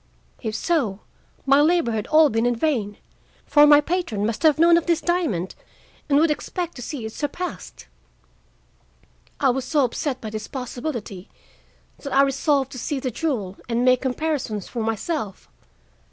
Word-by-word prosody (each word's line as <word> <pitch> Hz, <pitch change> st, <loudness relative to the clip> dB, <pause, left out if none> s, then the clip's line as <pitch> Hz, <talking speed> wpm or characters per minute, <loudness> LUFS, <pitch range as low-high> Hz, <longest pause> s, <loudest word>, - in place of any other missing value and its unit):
If 220 Hz, -3 st, -3 dB
so, 230 Hz, -, 0 dB, 0.4 s
my 275 Hz, +1 st, +5 dB
labor 325 Hz, -5 st, +2 dB
had 215 Hz, -2 st, -3 dB
all 310 Hz, -1 st, +5 dB
been 225 Hz, +2 st, +1 dB
in 245 Hz, -, +1 dB
vain, 230 Hz, -7 st, -1 dB, 0.5 s
for 295 Hz, 0 st, +6 dB
my 290 Hz, 0 st, +8 dB
patron 295 Hz, -, -2 dB
must 225 Hz, 0 st, -2 dB
have 315 Hz, -2 st, +4 dB
known 335 Hz, +1 st, +6 dB
of 335 Hz, 0 st, +1 dB
this 340 Hz, -1 st, +2 dB
diamond 310 Hz, -, -1 dB, 0.6 s
and 280 Hz, -, +4 dB
would 315 Hz, +1 st, +4 dB
expect 345 Hz, +3 st, -4 dB
to -, -, -7 dB
see 245 Hz, -1 st, -5 dB
it 220 Hz, -, -6 dB
surpassed. 330 Hz, +5 st, -5 dB, 1.5 s
"I 270 Hz, -2 st, +4 dB
was 260 Hz, +1 st, -2 dB
so 290 Hz, +2 st, +1 dB
upset 255 Hz, +2 st, -2 dB
by 220 Hz, -, -7 dB
this 215 Hz, 0 st, -5 dB
possibility 245 Hz, -, -6 dB, 0.7 s
that 280 Hz, -, -7 dB
I 275 Hz, -, +6 dB
resolved 275 Hz, 0 st, +1 dB
to 255 Hz, -, -7 dB
see 285 Hz, +3 st, -2 dB
the 255 Hz, -1 st, -3 dB
jewel 215 Hz, -, -3 dB
and 235 Hz, +1 st, +1 dB
make 255 Hz, 0 st, +4 dB
comparisons 260 Hz, -, -2 dB
for 235 Hz, -, -4 dB
myself. 220 Hz, -, -3 dB
270 Hz, 165 wpm, -23 LUFS, 225-310 Hz, 1.5 s, my